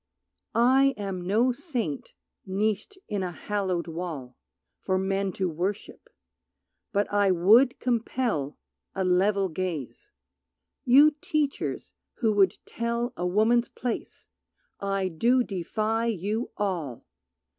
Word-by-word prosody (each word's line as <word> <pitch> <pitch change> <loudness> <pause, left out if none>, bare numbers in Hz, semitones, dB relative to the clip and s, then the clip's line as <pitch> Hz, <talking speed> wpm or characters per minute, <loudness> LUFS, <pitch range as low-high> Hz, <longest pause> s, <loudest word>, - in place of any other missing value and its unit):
I 265 +4 +4
am 190 -3 -4
no 230 +6 +3
saint 245 - -4 0.3
niched 210 - -2
in 205 -2 -2
a 180 -1 -2
hallowed 185 -2 -2
wall 160 -7 -6 0.4
For 185 - 0
men 195 +1 0
to 190 - -1
worship, 180 +5 -4 0.8
but 205 -1 +2
I 205 -1 +4
would 210 +9 +5
compel 230 - -1 0.4
A 190 - 0
level 195 +2 +3
gaze. 185 - -5 0.7
You 280 +5 +7
teachers 300 -3 -2 0.2
who 225 -4 +1
would 195 -2 +3
tell 235 +1 -2
A 180 - -2
woman's 225 +6 +3
place 245 -2 -5 0.5
I 195 -1 -1
do 235 +9 +2
defy 215 +4 -1
you 215 +2 -2
all! 170 - -3
205 Hz, 115 wpm, -27 LUFS, 185-235 Hz, 0.8 s, You